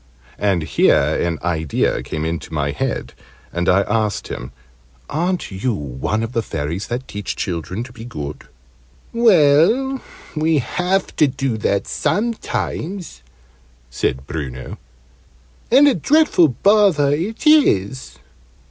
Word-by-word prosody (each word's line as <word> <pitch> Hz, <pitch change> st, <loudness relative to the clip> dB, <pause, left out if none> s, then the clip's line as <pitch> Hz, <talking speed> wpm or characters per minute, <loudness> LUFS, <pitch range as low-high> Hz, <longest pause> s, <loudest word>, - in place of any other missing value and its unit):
And 95 Hz, -5 st, +1 dB
here 80 Hz, -, +3 dB, 0.3 s
an 85 Hz, -2 st, -1 dB
idea 80 Hz, -4 st, 0 dB
came 80 Hz, 0 st, -4 dB
into 80 Hz, 0 st, -4 dB
my 75 Hz, -2 st, -1 dB
head, 70 Hz, -, -3 dB, 0.4 s
and 85 Hz, +1 st, 0 dB
I 95 Hz, +2 st, +5 dB
asked 105 Hz, +1 st, -1 dB
him 60 Hz, -, -6 dB, 0.6 s
"Aren't 175 Hz, -, -1 dB
you 105 Hz, +5 st, -1 dB
one 75 Hz, -, -3 dB
of 115 Hz, -, -4 dB
the 115 Hz, -, 0 dB
Fairies 80 Hz, -1 st, -4 dB
that 125 Hz, +2 st, -4 dB
teach 105 Hz, -1 st, -5 dB
children 90 Hz, +4 st, -3 dB
to 125 Hz, 0 st, -12 dB
be 115 Hz, -2 st, -10 dB
good?" 75 Hz, -, -7 dB, 0.7 s
"Well, 230 Hz, -, +4 dB, 0.3 s
we 155 Hz, +1 st, +2 dB
have 180 Hz, +8 st, -1 dB
to 150 Hz, -, +5 dB
do 130 Hz, -2 st, -2 dB
that 100 Hz, -1 st, 0 dB
sometimes," 200 Hz, -, -2 dB, 0.7 s
said 65 Hz, +1 st, -2 dB
Bruno, 65 Hz, -5 st, -6 dB, 0.9 s
"and 275 Hz, +5 st, +6 dB
a 280 Hz, -, +5 dB
dreadful 275 Hz, -, +4 dB
bother 180 Hz, -, +3 dB
it 185 Hz, -, -2 dB
is." 130 Hz, -, +3 dB
120 Hz, 125 wpm, -19 LUFS, -, 0.9 s, and